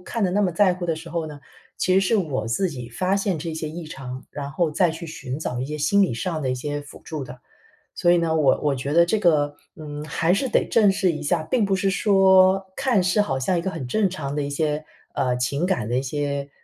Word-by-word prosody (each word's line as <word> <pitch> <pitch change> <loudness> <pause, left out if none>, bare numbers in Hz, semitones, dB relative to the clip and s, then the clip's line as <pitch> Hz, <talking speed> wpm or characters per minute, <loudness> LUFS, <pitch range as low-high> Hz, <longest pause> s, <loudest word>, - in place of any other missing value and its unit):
看 220 +3 -2
得 180 - +1
那 205 - +1
么 195 -3 +2
在 185 +2 +3
乎 175 -1 -5
的 165 -2 0
时 165 0 -9
候 165 -1 -2
呢， 150 -2 -9 0.4
其 185 - +1
实 190 - +5
是 195 +4 +2
我 150 - -1
自 185 +9 0
己 125 -5 -7
发 185 +11 0
现 195 -3 0
这 165 +2 -4
些 160 -1 -4
异 165 +2 -7
常， 130 -3 -8
然 140 -1 -6
后 155 +1 0
再 175 +2 +2
去 165 +1 -7
寻 130 -3 -6
找 125 -5 -3
一 130 - -2
些 150 +2 -4
心 155 +7 +2
理 185 - +1
上 165 +5 -3
的 135 -3 -1
一 - - 0
些 145 +3 -4
辅 145 - -13
助 155 -3 -5
的。 125 0 -9 0.6
所 175 - +3
以 175 - +4
呢， 160 -1 +1
我 145 -4 +3
我 145 -2 +1
觉 135 +2 -3
得 170 +2 +5
这 215 +4 +1
个， 145 -6 +2 0.2
嗯， 150 -1 -7
还 165 +3 +1
是 265 - 0
得 - - +2
正 210 -4 +5
视 190 -2 +1
一 155 - -5
下， 155 +2 0
并 230 +6 +1
不 195 -1 +1
是 190 +1 +1
说， 190 -1 +4
看 255 -8 +2
似 185 +4 +2
好 135 -8 -2
像 155 +8 0
一 - - -2
个 190 - -2
很 150 -7 -5
正 195 +7 +1
常 145 -6 -4
的 150 - 0
一 140 - -3
些， 150 +1 -1 0.3
呃， 130 -3 +1
情 140 +6 -1
感 180 - 0
的 120 - 0
一 130 - +1
些 140 0 -3
160 Hz, 280 characters per minute, -23 LUFS, 145-185 Hz, 0.6 s, 实